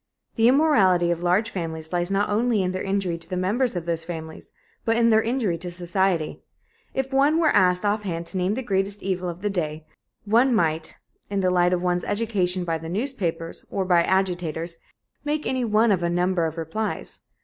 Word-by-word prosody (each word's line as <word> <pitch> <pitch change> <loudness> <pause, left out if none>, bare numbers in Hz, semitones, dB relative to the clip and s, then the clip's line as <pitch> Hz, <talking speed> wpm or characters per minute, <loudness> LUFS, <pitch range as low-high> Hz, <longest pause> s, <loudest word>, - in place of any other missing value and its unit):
The 225 0 +3
immorality 205 - +4
of 170 0 -2
large 185 +6 +1
families 160 -2 -5
lies 175 0 0
not 200 +1 +1
only 220 -1 +1
in 180 - 0
their 185 - -3
injury 195 -4 -1
to 165 - -12
the 185 - -2
members 215 +6 0
of 175 -2 -3
those 165 -1 -2
families 160 -2 -8 0.3
but 230 0 +1
in 230 0 +4
their 220 -1 +5
injury 225 -7 -1
to 180 +1 -5
society. 175 -1 -1 0.5
If 265 0 -2
one 285 +4 +4
were 315 -3 +4
asked 180 0 +3
offhand 200 -5 -1
to 190 - -5
name 185 +3 0
the 260 - -3
greatest 200 -1 -1
evil 185 -2 -2
of 175 +1 -7
the 205 - 0
day 155 -4 -3 0.4
one 235 +4 +4
might, 160 -4 0 0.3
in 200 -1 -1
the 185 -1 +2
light 180 0 +3
of 180 -1 0
one's 180 -1 0
education 195 -4 0
by 165 -1 -1
the 160 0 -7
newspapers, 180 -7 -2
or 195 - -1
by 175 -2 +4
agitators, 175 -3 -1 0.5
make 295 +1 -2
any 260 -1 0
one 220 0 +3
of 185 -3 +2
a 170 - 0
number 175 -1 +1
of 160 +1 -7
replies. 165 +7 -4
185 Hz, 200 wpm, -24 LUFS, 170-215 Hz, 0.5 s, their